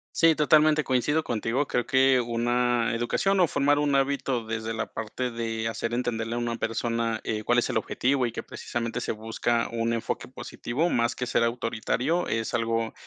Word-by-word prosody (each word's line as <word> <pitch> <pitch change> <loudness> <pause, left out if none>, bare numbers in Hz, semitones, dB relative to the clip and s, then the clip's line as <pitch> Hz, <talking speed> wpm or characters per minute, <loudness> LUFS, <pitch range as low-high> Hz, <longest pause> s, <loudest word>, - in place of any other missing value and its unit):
Sí, 165 -1 +5
totalmente, 150 0 +4
coincido 145 +5 +1
contigo. 120 +4 -1
Creo 120 -2 -1
que 130 -1 +4
una 120 0 +1
educación 190 +12 +1
o 175 - +6
formar 145 +1 +2
un 145 -1 +1
hábito 135 -3 0
desde 110 0 -3
la 110 - -4
parte 110 +3 -3
de 115 -1 -3
hacer 115 +1 -3
entenderle 115 -2 -2
a - - -1
una 120 -1 -2
persona, 115 0 -1
eh, 110 -1 -2
cuál 120 0 +2
es - - +2
el 115 - +1
objetivo 130 +3 0
y 115 - -4
que - - -5
precisamente 115 -1 -4
se - - -2
busca 115 +2 -1
un 115 0 0
enfoque 115 - -3
positivo, 155 +9 -3
más 120 0 +1
que 125 - -2
ser 120 - +1
autoritario, 120 +7 -1
es 115 0 -1
algo 115 -1 0
120 Hz, 185 wpm, -26 LUFS, 115-135 Hz, -, o